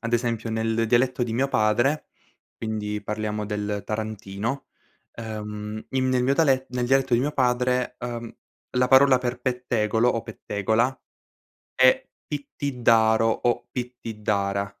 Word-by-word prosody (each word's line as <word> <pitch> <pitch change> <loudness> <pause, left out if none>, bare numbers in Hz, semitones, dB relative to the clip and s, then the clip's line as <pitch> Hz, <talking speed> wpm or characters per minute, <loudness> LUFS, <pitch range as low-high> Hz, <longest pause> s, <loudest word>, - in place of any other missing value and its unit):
ad 115 0 -4
esempio, 115 -1 0
nel 115 0 0
dialetto 125 +2 +2
di 120 -2 -1
mio 135 +3 +1
padre, 120 +7 +2 0.5
quindi 105 -2 -3
parliamo 105 0 -3
del 105 0 -3
tarantino, 110 +3 -4 0.5
ehm, 105 -1 -6
in 130 -1 +1
nel 130 -1 +2
mio 135 +2 +2
dale 135 -4 +3
nel 125 -1 -1
dialetto 135 0 +2
di 120 - +3
mio 145 +3 -1
padre, 125 -1 +1
uhm, 120 -1 -6 0.4
la 125 0 +2
parola 130 0 +6
per 125 0 -3
pettegolo 120 -2 +1
o 115 -2 0
pettegola 110 +3 -1 0.8
è 130 0 +4 0.2
"pittidaro" 115 -6 +2
o 120 +2 0
"pittidara". 105 -5 -2
115 Hz, 130 wpm, -25 LUFS, 110-125 Hz, 0.8 s, parola